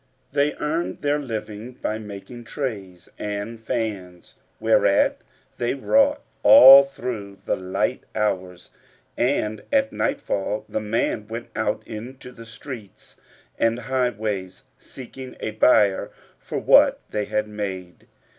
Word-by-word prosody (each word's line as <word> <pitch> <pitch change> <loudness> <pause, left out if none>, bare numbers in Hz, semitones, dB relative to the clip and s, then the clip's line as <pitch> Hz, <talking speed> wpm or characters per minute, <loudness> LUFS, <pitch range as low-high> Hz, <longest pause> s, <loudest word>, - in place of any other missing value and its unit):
They 145 +1 +1
earned 155 +2 -3
their 145 +1 +1
living 110 -2 -6
by 110 -3 -4
making 110 +3 -10
trays[FN#474] 100 - -6
and 105 +2 -5
fans, 105 -7 -4 0.3
whereat - - +3 0.4
they 120 +2 0
wrought 275 - +2 0.2
all 140 - +10
through 120 -7 -6
the - - +1
light 95 0 -2
hours; 95 -4 -2 0.4
and, 110 -5 0
at 275 -1 +2
nightfall, 105 - -2
the - - -2
man 105 0 -1
went 115 +1 -7
out 105 -1 -2
into 125 +4 -9
the 115 -2 -13
streets 110 -2 -11 0.4
and 115 0 +2
highways 110 -6 -2
seeking 130 0 -11
a 110 - -3
buyer 105 -3 +3 0.3
for - - -6
what - - +5
they 105 -1 -1
had 105 +1 -1
made. 95 -4 -6
110 Hz, 120 wpm, -23 LUFS, 105-130 Hz, 0.4 s, all